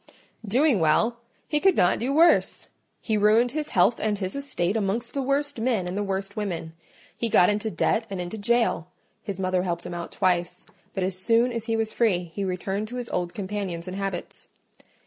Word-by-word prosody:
"Doing 255 +2 +3
well! 220 +10 +2 0.3
He 300 - +1
could 380 +2 +3
not 175 - +3
do 250 +4 -1
worse: 330 +4 +3 0.3
he 215 -2 0
ruined 220 +4 +4
his 305 +2 -3
health 230 - +3
and 215 -1 0
his 190 -1 -4
estate 220 -9 -1
amongst 225 +3 -1
the 275 - -1
worst 280 0 0
men 225 -7 0
and 180 - -3
the 205 - -1
worst 195 0 -2
women. 175 -6 -4 0.4
He 230 - -1
got 180 -2 +5
into 210 +2 -1
debt 225 +1 0
and 195 -2 -4
into 180 +5 -5
jail: 230 -5 +1 0.3
his 200 -3 -6
mother 185 -1 +1
helped 175 -1 -3
him 175 - -6
out 170 0 -6
twice, 175 -1 0 0.3
but 190 - -1
as 185 0 -2
soon 230 +4 +3
as 230 -2 -4
he 225 -1 0
was 220 -1 -1
free 200 -7 +2
he 200 - -3
returned 195 +3 -2
to 245 - -8
his 245 -1 -4
old 175 -1 -2
companions 190 -4 -4
and 185 - -5
habits. 195 -2 -5
205 Hz, 200 wpm, -25 LUFS, 185-235 Hz, 0.4 s, got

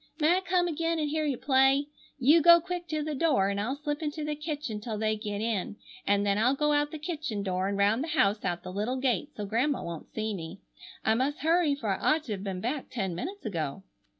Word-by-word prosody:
May 320 +4 +4
I - - -1
come 360 -1 +1
again 330 0 -1
and 305 -1 0
hear 310 0 0
you 280 -4 0
play? 270 +2 +3 0.3
You 295 +5 +5
go 340 +2 +8
quick 355 +1 -5
to 310 -2 -2
the 305 0 -3
door, 270 -10 +2
and 200 0 -1
I'll 250 +6 -1
slip 295 +1 -4
into 305 0 -3
the 300 - -1
kitchen 295 -8 -4
till 220 -1 -4
they 215 0 +1
get 210 -1 -4
in, 215 - -2 0.3
and 200 0 +3
then 200 0 +2
I'll 250 +5 +3
go 300 +1 +2
out 290 0 +2
the 315 - -6
kitchen 300 - -4
door 185 -1 -1
and 200 0 -1
round 205 +6 +3
the - - -4
house 200 +2 +3
out 175 -1 -2
the 185 - -7
little 215 +6 -1
gate 260 +2 0
so 210 - -3
Grandma 245 +8 0
won't 170 -2 -7
see 220 0 -2
me. 170 0 -7 0.5
I 220 - +4
must 265 +5 -1
hurry 325 -2 +3
for 230 -7 -4
I - - -4 0.2
ought 315 - -5
to 245 - -7
have 195 -2 -3
been 190 -2 -4
back 260 +5 -3
ten 190 -7 -2
minutes 365 - -6
ago." 170 -3 -3
260 Hz, 245 wpm, -29 LUFS, 205-305 Hz, 0.5 s, go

